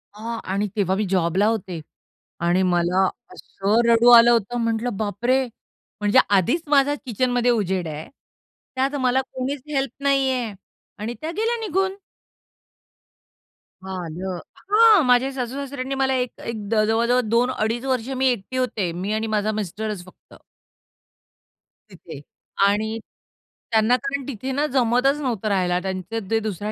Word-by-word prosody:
अ 225 +2 -5
आणि 200 +2 -1
तेव्हा 190 -3 +1
मी 210 +2 -1
जॉबला 185 +1 +2
होते. 190 -6 -2 0.6
आणि 175 +2 +2
मला 180 +1 +2 0.3
असं 200 +4 -1
रडू 235 +1 +5
आलं 235 0 +8
होतं. 235 +1 +1
म्हंटलं 230 -1 -1
बापरे! 235 +6 0 0.6
म्हणजे 210 +5 +4
आधीच 205 - +2
माझा 285 0 +4
किचनमध्ये 245 +1 +1
उजेड 190 -6 -1
आहे. 155 0 -6 0.7
त्यात 270 +2 0
मला 255 +1 +2
कोणीच 265 +1 -5
हेल्प 270 -3 0
नाहीये 265 -5 +1 0.5
आणि 220 +3 -4
त्या 315 +1 -3
गेल्या 455 +2 +1
निघून. 385 +1 0 1.9
आलं. 180 0 -5 0.3
हां 435 -2 +7
माझ्या 250 +2 +3
सासूसासऱ्यांनी 265 +1 -4
मला 265 0 +1
एक 250 -1 -3
एक 220 -3 -5
द 215 -1 +3
जवळ-जवळ 235 +3 +2
2 240 +3 +2
अडीच 235 +1 -2
वर्ष 255 -2 -1
मी 265 +1 +2
एकटी 245 0 -2
होते. 220 -8 -1
मी 185 +5 -3
आणि 220 +1 -1
माझा 215 0 0
मिस्टरच 210 -1 -4
फक्त. 185 - -18 1.5
तिथे. 170 -6 -11 0.5
आणि 220 +2 0 0.7
त्यांना 220 +2 +4
कारण 275 -1 -3
तिथे 265 0 -5
ना 285 +3 0
जमतच 255 +3 +2
नव्हतं 230 -6 -2
राहायला 180 -3 +1
त्यांचे 190 +3 -4
ते 225 - +3
दुसऱ्या 210 -1 -4
230 Hz, 135 wpm, -22 LUFS, 200-260 Hz, 1.9 s, आलं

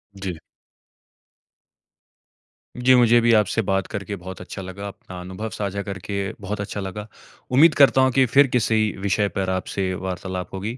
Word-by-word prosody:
जी। 95 -2 -4 2.4
जी, 125 +1 +4
मुझे 120 -1 +5
भी 115 0 +4
आपसे 105 +2 0
बात 95 -1 -1
करके 100 0 -5
बहुत 95 +1 -8
अच्छा 95 - -8
लगा, 100 +2 -7
अपना 95 -2 -10
अनुभव 95 +5 -6
साझा 100 -1 -3
करके 100 0 -6 0.3
बहुत 100 +1 -4
अच्छा 100 0 -5
लगा। 100 +2 -6 0.4
उम्मीद 155 +5 +6
करता 135 -2 +5
हूँ 130 0 +4
कि 135 +1 +4
फिर 135 +3 +5
किसी 110 -2 +2
विषय 100 +1 +1
पर 95 -1 -1
आपसे 95 0 -2
वार्तालाप 90 0 -5
होगी, 105 +6 -4
100 Hz, 155 wpm, -22 LUFS, 95-115 Hz, 2.4 s, उम्मीद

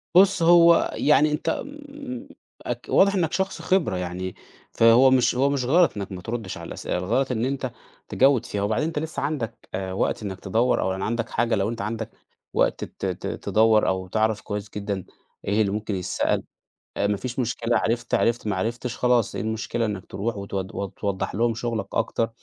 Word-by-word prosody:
بُصّ، 190 -1 +6
هو 170 0 +6
يعني 150 0 +4
أنت 150 - -1 0.4
م 280 -2 -7 0.6
واضح 200 +1 +5
إنّك 165 -4 +1
شخص 190 +1 -1
خبرة 165 - +1
يعني، 90 +1 -4 0.4
فهو 115 +3 +6
مش 125 -2 +3
هو 135 +3 +3
مش 140 -3 0
غلط 165 -1 +4
إنّك 100 -1 -5
ما 90 -1 -6
تردّش 110 -1 -5
على - - -8
الأسئلة، - - -3
الغلط 115 +9 0
إن 115 -1 0
أنت 130 -1 -2 0.4
تجوّد 130 -3 +3
فيها، 100 - -3
وبعدين 110 +9 0
أنت 160 -2 -2
لسه 160 +1 -4
عندك 130 -6 -4
آآ، 95 0 -3
وقت 100 - -1
إنّك 95 -2 -5
تدوّر، 115 +6 +1
أو 95 - 0
يعني 95 +1 -3
عندك 115 +1 -2
حاجة، 120 -1 +1
لو 100 0 0
أنت 115 0 -4
عندك 110 +2 -3 0.4
وقت - - +1
ت - - -6
ت - - -3
تدوّر 110 0 +3
أو 95 0 -1
تعرف 110 +2 0
كويس 105 0 -5
جدًا 100 -2 -3 0.4
إيه 105 +2 +2
اللي 100 -2 +1
ممكن 105 0 -2
يتسأل 90 -1 0 0.5
ما 100 0 +1
فيش 125 +5 -5
مشكلة. 120 -1 0
عرِفت، 120 +1 -1
عرِفت، 115 -1 +2
ما 105 - 0
عرِفتش 115 +5 -3
خلاص، 125 -3 +2
إيه - - -2
المشكلة 110 +1 -2
إنك 100 -4 -4
ترُوح 110 +3 -3
وت 100 0 -7
ت 95 0 -4
توضّح 100 -3 -2
لهُم 115 +2 +2
شُغلك 115 -3 -3
أكتر. 115 0 0
115 Hz, 185 wpm, -24 LUFS, 100-130 Hz, 0.6 s, بُصّ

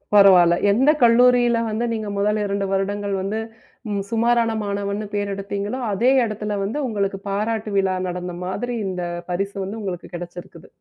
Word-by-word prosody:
பரவால்ல. 185 -4 +7 0.2
எந்தக் 275 +8 +3
கல்லூரில 240 0 +5
வந்து 220 +2 -1
நீங்க 220 -2 -3
முதல் 210 +2 +1
2 200 0 -1
வருடங்கள் 200 +1 -1
வந்து 200 +3 -2 0.5
ம் 200 -1 -1
சுமாரான 230 0 +2
மாணவன்னு 200 +1 -3
பேர் 205 -1 -1
எடுத்தீங்களோ 200 +4 -4
அதே 235 +6 +3
இடத்துல 210 -1 -3
வந்து 210 +8 -3
உங்களுக்குப் 200 -3 -2
பாராட்டு 215 +2 -2
விழா 190 -1 +2
நடந்த 180 0 -4
மாதிரி 245 +6 -3
இந்தப் 175 -2 -4
பரிசு 195 +3 -2
வந்து 205 +4 -5
உங்களுக்குக் 185 -3 -6
கிடச்சிருக்குது. 175 -1 -9
200 Hz, 150 wpm, -22 LUFS, 195-220 Hz, 0.5 s, பரவால்ல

